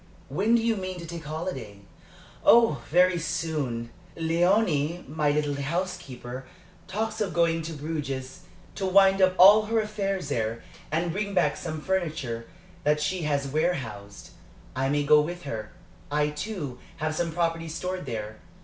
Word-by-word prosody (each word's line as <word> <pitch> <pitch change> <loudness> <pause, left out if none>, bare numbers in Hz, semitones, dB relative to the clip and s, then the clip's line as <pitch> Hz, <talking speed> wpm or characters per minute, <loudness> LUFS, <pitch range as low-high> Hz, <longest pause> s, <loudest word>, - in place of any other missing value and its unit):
When 200 +11 +2
do 230 - +2
you 225 -1 +2
mean 185 -1 -4
to 170 - -7
take 165 -1 -7
a - - -8
holiday?" 135 - -5 0.6
"Oh, 230 - +6
very 180 +2 +4
soon. 140 -8 -2 0.3
Léonie, 170 -1 +1
my 150 +1 0
little 145 0 +1
housekeeper, 135 -6 -4 0.4
talks 220 +3 -2
of 195 -4 -1
going 165 -1 +3
to 165 +1 -5
Bruges 140 -4 -4 0.3
to 195 - -2
wind 195 0 +5
up 185 0 +4
all 205 +4 +8
her 225 +1 +1
affairs 195 -6 -2
there 115 -3 -2 0.3
and 165 +2 0
bring 200 +2 -3
back 160 -5 +3
some 155 -1 -5
furniture 155 -11 -2 0.4
that 150 +1 +3
she 180 +4 -1
has 140 -1 0
warehoused. 115 - -3 0.4
I 135 +1 0
may 145 +1 +1
go 150 +1 +6
with 175 +3 -5
her. 110 -6 -5 0.4
I, 150 0 +2
too, 150 - -5 0.2
have 155 0 -1
some 170 +1 -1
property 165 0 -1
stored 180 0 -4
there. 110 -2 -5
160 Hz, 155 wpm, -27 LUFS, 140-185 Hz, 0.6 s, all